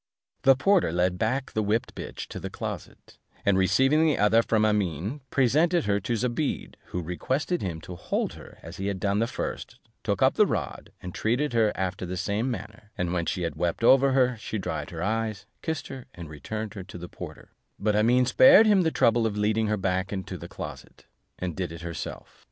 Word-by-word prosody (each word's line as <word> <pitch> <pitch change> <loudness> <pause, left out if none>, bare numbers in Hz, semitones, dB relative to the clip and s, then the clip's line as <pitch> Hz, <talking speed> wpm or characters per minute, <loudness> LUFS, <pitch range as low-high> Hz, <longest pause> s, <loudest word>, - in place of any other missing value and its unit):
The 135 0 +6
porter 175 - +3
led 90 +1 +1
back 130 +6 -1
the 110 - 0
whipped 110 +4 0
bitch - - -6
to - - -6
the - - -5
closet, - - -7 0.3
and 100 - +4
receiving 135 +11 +4
the 155 -2 +3
other 110 +2 +5
from 110 -2 +2
Amene, 105 - -1
presented 155 +6 +3
her 100 0 +2
to 115 +4 -2
Zobeide, 125 +5 -2
who 90 - -4
requested 130 - -1
him 85 -4 -3
to 90 - -8
hold - - -2
her - - -13
as 85 +2 -9
he 95 - -3
had 100 -2 -2
done 100 +2 +1
the 115 - +1
first, - - -5 0.3
took - - 0
up - - +5
the - - +4
rod, - - -4
and 90 -1 -6
treated 125 +5 0
her 110 -2 +3
after 95 -1 -3
the 90 +1 -4
same 105 +6 -1
manner; 105 -2 -7
and 90 -2 -1
when 85 -2 -1
she 90 - -1
had 85 - -2
wept 85 +6 -1
over 135 +2 +6
her, 125 -2 +3
she 110 0 -4
dried 95 - -4
her 85 0 -5
eyes, 110 -1 -2 0.2
kissed 160 -2 -3
her, 130 -2 -8
and 85 -3 -9
returned 110 +9 -5
her 100 - -6
to 90 -1 -10
the 90 0 -7
porter: - - -10 0.3
but 105 0 +1
Amene 120 +4 +4
spared 260 - +7
him 205 -3 +5
the 165 - +2
trouble 115 -6 +3
of 105 -1 -4
leading 110 +1 +1
her 105 0 +1
back 95 0 -1
into 95 -3 -4
the - - -8
closet, - - -9 0.3
and 90 -3 -4
did 90 -3 -3
it 85 -1 -8
herself. 85 -1 -7
105 Hz, 210 wpm, -27 LUFS, 90-125 Hz, 0.3 s, spared